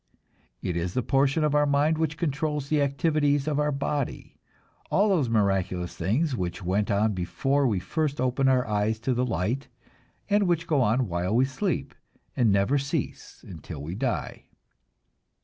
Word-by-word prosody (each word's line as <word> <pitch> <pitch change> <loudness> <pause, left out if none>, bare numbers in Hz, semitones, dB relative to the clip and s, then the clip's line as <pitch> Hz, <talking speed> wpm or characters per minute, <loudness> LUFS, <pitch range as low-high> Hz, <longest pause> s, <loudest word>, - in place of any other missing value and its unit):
It 90 - -2
is 85 +1 -2
the 130 - +1
portion 135 +5 +2
of 150 -1 +1
our 145 0 +3
mind 145 +3 +2
which 155 -1 -1
controls 150 -2 -2
the 150 -2 +2
activities 145 0 +1
of 150 -1 0
our 150 0 +1
body, 140 -1 -3 0.5
all 205 +2 +3
those 160 -11 +2
miraculous 95 -5 0
things 130 - 0
which 90 -2 -4
went 100 +4 0
on 105 +1 +2
before 135 +10 0
we 105 -5 +1
first 150 - -2
opened 130 +1 +2
our 130 -1 +3
eyes 105 0 0
to 130 +2 0
the 125 +1 0
light, 115 +6 -2 0.6
and 205 -1 +2
which 170 -1 +1
go 150 -5 +2
on 120 +1 +2
while 90 +3 -1
we 130 +2 +4
sleep, 135 0 -2 0.4
and 120 -5 +3
never 100 +9 +2
cease 140 0 -4
until 80 -4 -8
we 80 +4 -5
die. 125 +5 -3
135 Hz, 165 wpm, -26 LUFS, 105-150 Hz, 0.6 s, we